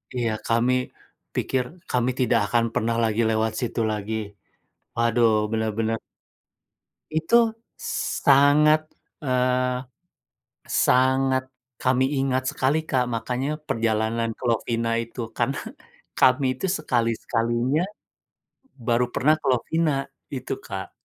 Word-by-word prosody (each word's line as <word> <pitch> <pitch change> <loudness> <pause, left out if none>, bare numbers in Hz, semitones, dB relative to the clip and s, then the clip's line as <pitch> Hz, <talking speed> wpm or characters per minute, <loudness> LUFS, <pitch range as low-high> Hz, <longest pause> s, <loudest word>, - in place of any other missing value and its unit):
iya. 120 -3 0
Kami 125 +2 +1 0.5
pikir 130 -1 0 0.3
kami 125 0 +2
tidak 115 -4 +2
akan 120 -1 +4
pernah 115 +1 0
lagi 110 0 +1
lewat 110 0 +1
situ 120 -1 -2
lagi. 105 0 -4 0.6
Waduh, 115 -2 +2
bener-bener 110 0 -1 1.1
Itu 160 +9 +1 0.9
sangat 145 +2 +6 0.4
eee, 125 -1 +1 1.0
sangat 130 0 +3 0.4
kami 130 0 +2
ingat 130 -1 +1
sekali, 130 +3 +1
Kak. 130 -3 +2
Makanya 125 +4 -2 0.2
perjalanan 115 0 0
ke - - -22
Lovina 115 0 0
itu. 115 +2 -7 0.2
Karena - - 0 0.6
kami 130 +1 +4
itu - - -1
sekali-sekalinya 120 +1 0 1.1
baru 120 +1 +3
pernah 150 +4 +4
ke - - -12
Lovina. 160 +6 +1 0.4
Itu, 130 -2 -4
Kak. 95 -1 -6
120 Hz, 105 wpm, -24 LUFS, 115-130 Hz, 1.1 s, sangat